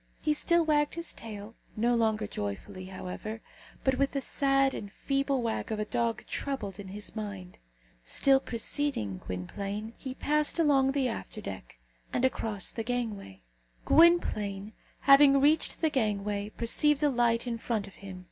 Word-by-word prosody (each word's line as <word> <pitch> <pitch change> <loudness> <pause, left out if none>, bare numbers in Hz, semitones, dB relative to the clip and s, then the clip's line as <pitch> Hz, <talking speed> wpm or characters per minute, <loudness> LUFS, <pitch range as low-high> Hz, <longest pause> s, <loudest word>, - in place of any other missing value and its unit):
He 305 - +1
still 340 +2 +2
wagged 295 -1 +2
his 335 0 -3
tail 215 -1 -9 0.2
no 235 +3 +2
longer 220 -2 +1
joyfully, 185 - -5
however, 190 +4 -6 0.4
but 265 -1 +1
with 275 0 +1
the 280 - 0
sad 275 0 +2
and 200 - -6
feeble 275 +1 -1
wag 225 0 -2
of 220 - -1
a 210 - -1
dog 230 -1 -1
troubled 215 -9 -4
in 200 - -7
his 205 +3 -8
mind. 200 -4 -6 0.4
Still 270 - +4
preceding 230 - -2
Gwynplaine, 200 - -5
he 260 -1 -6
passed 300 +3 +1
along 275 -5 +3
the 275 -2 +1
after 225 -2 -4
deck, 95 - -8 0.3
and 250 - +1
across 220 -5 -1
the 225 - -4
gangway. 220 - -4 0.4
Gwynplaine, 215 - +3 0.3
having 275 0 +7
reached 300 +3 +2
the 320 -2 +2
gangway, 205 -4 -1
perceived 290 +7 +2
a 295 - +5
light 235 -1 +2
in 235 -2 -3
front 225 -3 -2
of 195 - -13
him. 190 -2 -8
230 Hz, 155 wpm, -29 LUFS, 205-275 Hz, 0.4 s, having